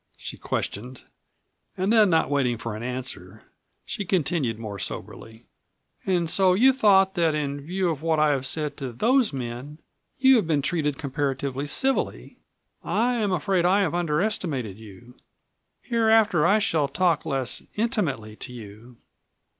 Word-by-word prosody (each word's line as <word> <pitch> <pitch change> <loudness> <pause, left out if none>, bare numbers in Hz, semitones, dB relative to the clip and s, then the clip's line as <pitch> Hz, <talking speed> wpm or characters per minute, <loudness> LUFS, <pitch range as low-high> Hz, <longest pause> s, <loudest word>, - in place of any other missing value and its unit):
she - - -7
questioned. 125 +5 -4 0.7
And 190 +4 +1
then 215 -3 +5
not 160 -3 +2
waiting 130 -4 +1
for 115 -1 -5
an 110 - -7
answer 120 -5 -6 0.4
she - - -4
continued 160 - 0
more 105 -3 -7
soberly: 110 +3 -7 0.6
"And 175 -3 +1
so 185 +2 +3
you 260 +6 +5
thought 195 -6 +4
that 165 -4 +1
in 145 -1 -3
view 180 +5 -2
of 150 -3 -5
what 160 -1 +1
I 150 -1 +3
have 135 -2 -1
said 150 0 -3
to 135 -4 -5
those 245 - +2
men 130 +2 -6 0.4
you 265 -1 +6
had 210 - 0
been 150 -4 +1
treated 150 -3 -1
comparatively 140 -1 -3
civilly. 270 - -2 0.4
I 240 +3 +1
am 210 -4 0
afraid 180 +1 +1
I 190 +3 +3
have 170 -5 0
underestimated 155 - -1
you. 110 +4 -14 0.7
Hereafter 220 -8 +3
I 205 - +5
shall 160 -8 +1
talk 170 -1 +1
less 135 -5 -2
intimately 165 - -2
to - - -7
you." 115 +1 -12
150 Hz, 150 wpm, -25 LUFS, 125-190 Hz, 0.7 s, you